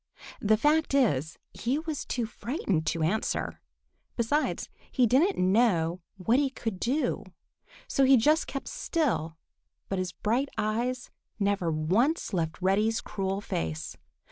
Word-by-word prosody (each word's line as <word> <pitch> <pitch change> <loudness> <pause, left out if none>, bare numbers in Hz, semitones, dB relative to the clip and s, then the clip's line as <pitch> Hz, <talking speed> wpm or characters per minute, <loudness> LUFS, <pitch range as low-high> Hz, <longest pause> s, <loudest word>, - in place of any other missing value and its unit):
The 215 +1 +4
fact 300 +3 +2
is, 160 - +2 0.2
he 250 +5 -1
was 315 -2 -4
too 240 -3 -1
frightened 215 - -2
to 165 +1 0
answer. 195 +8 -1 0.5
Besides, 270 +6 0 0.2
he 255 - +3
didn't 295 - +3
know 185 -4 +2 0.2
what 225 +7 +2
he 285 -2 +2
could 225 -7 -5
do. 270 +8 0 0.6
So 275 - +2
he 265 0 +7
just 305 +7 +3
kept 275 - -5
still, 220 - -1 0.5
but 195 - -1
his 185 -2 -2
bright 245 +6 0
eyes 240 +4 -1 0.3
never 200 -4 +1
once 200 - +1
left 165 -3 -1
Reddy's 210 +4 +2
cruel 195 0 -3
face. 80 - -3
220 Hz, 135 wpm, -28 LUFS, 185-270 Hz, 0.6 s, he